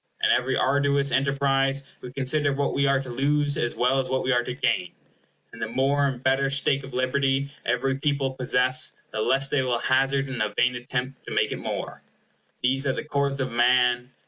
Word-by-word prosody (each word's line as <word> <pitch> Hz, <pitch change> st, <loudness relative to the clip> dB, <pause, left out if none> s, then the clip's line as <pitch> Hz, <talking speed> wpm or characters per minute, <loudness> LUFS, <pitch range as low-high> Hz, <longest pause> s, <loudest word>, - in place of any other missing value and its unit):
In -, -, +4 dB
every -, -, +1 dB
arduous 140 Hz, 0 st, +1 dB
enterprise 135 Hz, 0 st, +1 dB, 0.2 s
we 125 Hz, -, -8 dB
consider 140 Hz, +2 st, +1 dB
what 140 Hz, +1 st, -1 dB
we 140 Hz, 0 st, +1 dB
are 135 Hz, 0 st, +3 dB
to 130 Hz, -1 st, -7 dB
lose, 145 Hz, +3 st, 0 dB
as 120 Hz, -, -2 dB
well 125 Hz, +2 st, +2 dB
as 130 Hz, -1 st, -2 dB
what 130 Hz, 0 st, 0 dB
we 130 Hz, -, 0 dB
are 120 Hz, -1 st, +2 dB
to 125 Hz, -, -5 dB
gain; 90 Hz, -8 st, -1 dB, 0.6 s
and -, -, -11 dB
the -, -, -1 dB
more 140 Hz, +4 st, +1 dB
and 130 Hz, -2 st, -5 dB
better 135 Hz, +1 st, +2 dB
stake 135 Hz, 0 st, +1 dB
of 135 Hz, -1 st, -9 dB
liberty 135 Hz, +2 st, 0 dB, 0.2 s
every 130 Hz, +2 st, 0 dB
people 140 Hz, -2 st, 0 dB
possess, 130 Hz, 0 st, +1 dB, 0.2 s
the 110 Hz, -, -3 dB
less 135 Hz, +4 st, +2 dB
they 140 Hz, -, +1 dB
will 125 Hz, -2 st, 0 dB
hazard 135 Hz, +2 st, +1 dB
in 130 Hz, -4 st, -4 dB
a 105 Hz, -1 st, -2 dB
vain 125 Hz, +1 st, +3 dB
attempt 125 Hz, +1 st, -5 dB
to -, -, -6 dB
make -, -, +1 dB
it -, -, -4 dB
more. -, -, -5 dB, 0.6 s
These 135 Hz, +2 st, +3 dB
are 135 Hz, -, +1 dB
the -, -, -4 dB
cords 140 Hz, -2 st, -1 dB
of 130 Hz, -, -2 dB
man. 125 Hz, +1 st, +2 dB
135 Hz, 205 wpm, -25 LUFS, 125-140 Hz, 0.6 s, In